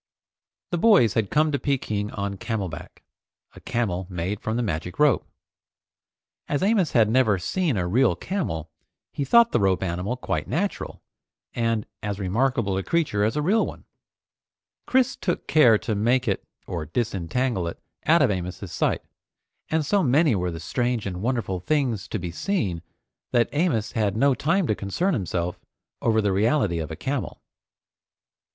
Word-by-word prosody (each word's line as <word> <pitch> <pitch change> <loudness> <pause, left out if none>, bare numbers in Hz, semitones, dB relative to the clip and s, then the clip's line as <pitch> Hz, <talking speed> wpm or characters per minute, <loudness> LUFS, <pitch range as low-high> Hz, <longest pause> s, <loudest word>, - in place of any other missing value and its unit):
The 175 - 0
boys 185 - +5
had 110 -4 0
come 155 +1 +2
to 140 - 0
Peking 110 -7 -1
on 100 -1 -3
camel 105 -3 -3
back, 75 - -10 0.5
a - - -12
camel 95 -6 -2
made 90 +3 -3
from 110 +1 -2
the 120 - 0
magic 90 -2 -3
rope. 150 -7 +3 1.2
As 145 +4 0
Amos 195 -5 +2
had 115 -3 +5
never 110 -3 +3
seen 155 - -1
a 90 - 0
real 115 0 +3
camel, 85 - -3 0.4
he 145 - -2
thought 235 - +5
the - - +2
rope 95 -2 +2
animal 95 +7 -2
quite - - -3
natural, 195 +5 -3 0.5
and 115 -2 0 0.2
as 105 -2 -3
remarkable 110 +1 0
a - - -3
creature 150 - +1
as 110 +5 +1
a 150 - 0
real 210 +7 +3
one. - - -7 1.0
Chris 260 0 +2
took 175 - -2
care 125 -8 +5
to 110 - -3
make 120 +5 +1
it 100 - 0 0.2
or 85 -3 -4
disentangle 105 - -1
it 85 - -6 0.3
out 165 0 +6
of 125 - +3
Amos's 90 0 -4
sight, - - 0 0.7
and 160 -1 +1
so 200 +7 +2
many 145 -1 +3
were 90 -3 0
the 85 -1 -6
strange 120 +5 -1
and 90 -2 -4
wonderful 115 -6 -1
things 125 - 0
to - - -3
be 90 -3 -5
seen, 95 - -1 0.5
that 120 -1 +3
Amos 145 - 0
had 105 -2 0
no 140 +3 +4
time 165 +8 +1
to 110 - +1
concern 105 - -1
himself 90 - -2 0.4
over 110 -1 +2
the 100 -2 +1
reality 105 - +2
of 80 -1 -4
a 80 - -5
camel. 130 - -3
115 Hz, 165 wpm, -24 LUFS, 95-145 Hz, 1.2 s, out